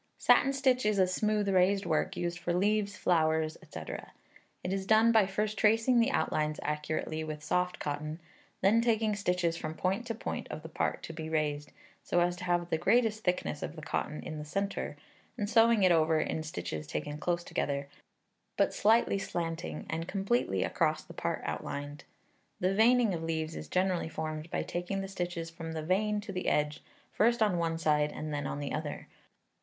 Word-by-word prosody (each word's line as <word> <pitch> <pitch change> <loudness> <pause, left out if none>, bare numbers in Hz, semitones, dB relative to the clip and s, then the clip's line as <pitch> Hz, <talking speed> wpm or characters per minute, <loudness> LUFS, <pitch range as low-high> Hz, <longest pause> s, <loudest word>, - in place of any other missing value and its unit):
Satin 275 - +5
stitch 265 -2 +2
is 210 -1 +2
a 190 - +5
smooth 210 +3 0
raised 195 +1 +3
work, 155 - 0
used 175 0 -2
for 175 0 -1
leaves, 205 +2 +1
flowers, 160 -2 +2 0.2
&c. - - -5 0.8
It 180 - -1
is 195 -1 -3
done 220 +2 +6
by 220 -4 +5
first 210 +2 -2
tracing 225 +3 +4
the 230 +3 +4
outlines 155 - 0
accurately 150 +1 -2
with 155 -1 -6
soft 180 +3 0
cotton, 150 +2 -4 0.4
then 210 +4 +5
taking 220 -2 +2
stitches 180 -4 0
from 155 -1 -5
point 195 +8 -1
to 230 - -2
point - - -4
of 155 - -6
the 160 - -8
part - - -2
to 165 - -6
be 160 0 -5
raised, 150 -2 -1 0.3
so 175 - +1
as 175 0 +2
to 180 - -6
have 175 -1 0
the 160 - +1
greatest 225 -1 +2
thickness 180 -5 -1
of 160 - -5
cotton 150 +1 -3
in 155 - -5
the - - -5
centre, 195 +6 -3 0.4
and 205 -3 -1
sewing 230 -1 +5
it 185 - +6
over, 160 -1 +4
in 155 - -1
stitches 85 - -5
taken 150 - -4
close 175 +1 -1
together, 140 -4 -2 0.7
but - - +3
slightly 220 -1 +3
slanting, 170 -3 -4
and 165 +1 -3
completely 195 - 0
across - - 0
the - - -12
part - - -2
outlined. 145 +1 -5 0.5
The 185 +1 +1
veining 230 0 +4
of 165 - -3
leaves 160 -1 -2
is - - -6
generally 185 -2 0
formed 155 0 -4
by - - -1
taking 180 +3 -3
the 195 - -4
stitches 175 -3 -4
from 165 -1 -6
the 160 -1 -4
vein 210 +5 +1
to 205 -1 -7
the 185 -1 -3
edge, 150 0 +1 0.3
first 235 +1 +3
on 190 -5 +2
one 165 -1 0
side 150 -2 +2
and 155 -1 -5
then 145 -1 -2
on 145 - -4
the 145 -1 -3
other. 150 -1 -4
175 Hz, 190 wpm, -31 LUFS, 155-205 Hz, 0.8 s, done